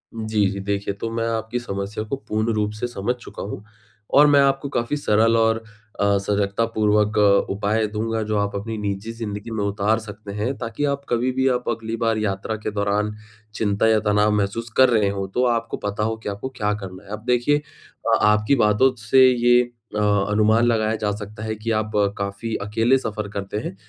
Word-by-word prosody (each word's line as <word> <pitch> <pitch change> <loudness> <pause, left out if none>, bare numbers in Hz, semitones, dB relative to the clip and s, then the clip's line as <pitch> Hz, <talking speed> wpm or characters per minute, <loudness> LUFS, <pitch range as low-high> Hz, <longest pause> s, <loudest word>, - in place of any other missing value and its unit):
जी, 110 -2 0
जी। 100 - -5
देखिए 100 0 -2
तो 110 +3 -5
मैं 115 0 -1
आपकी 115 +2 -2
समस्या 100 -2 -4
को 110 +5 -3
पूर्ण 110 +2 0
रूप 105 -1 0
से 105 +3 -3
समझ 120 +1 -2
चुका 120 -4 -9
हूँ। 100 0 -6 0.5
और 145 +1 +7
मैं 145 -1 +5
आपको 135 0 +1
काफ़ी 120 +2 -1
सरल 115 -2 +3
और 115 0 +2 0.4
अ, 100 0 +3
सजगतापूर्वक 105 +1 +1 0.3
उपाय 105 +2 0
दूँगा 110 +1 -1
जो 105 0 -1
आप 100 0 -1
अपनी 110 +3 -4
निजी 105 +1 -3
ज़िन्दगी 110 -1 -6
में 110 -2 -2
उतार 100 +2 +1
सकते 105 -1 -9
हैं 110 +6 -2
ताकि 115 +4 -4
आप 140 0 -3
कभी 120 +2 +1
भी 130 +1 +1
आप 125 - -3
अगली 115 -1 -3
बार 115 -1 +2
यात्रा 105 0 -2
के 110 0 -4
दौरान 105 +1 0 0.4
चिंता 105 0 +1
या 110 -1 +4
तनाव 105 0 +2
महसूस 105 +3 -1
कर 130 -1 +7
रहे 110 -4 +3
हों 100 -1 -3
तो 125 - +1
आपको 115 -1 0
पता 105 +1 -3
हो 110 +1 0
कि - - -3
आपको 100 +6 -5
क्या 105 -3 0
करना 95 -2 -8
है। 100 - -17
अब 105 +1 -6
देखिए 125 +4 +2
अ, 150 -1 -3
आपकी 105 +5 +3
बातों 120 +3 +3
से 130 +4 +5
ये 120 0 +4 0.3
अ, - - 0
अनुमान 105 +2 +3
लगाया 110 -2 +1
जा 105 -1 -1
सकता 105 +1 -7
है 110 0 -3
कि 110 +2 -3
आप 110 0 -7 0.3
काफ़ी 100 +3 -3
अकेले 115 +5 +3
सफ़र 110 -4 -4
करते 100 +1 -4
हैं। 100 - -5
110 Hz, 200 wpm, -22 LUFS, 105-115 Hz, 0.5 s, और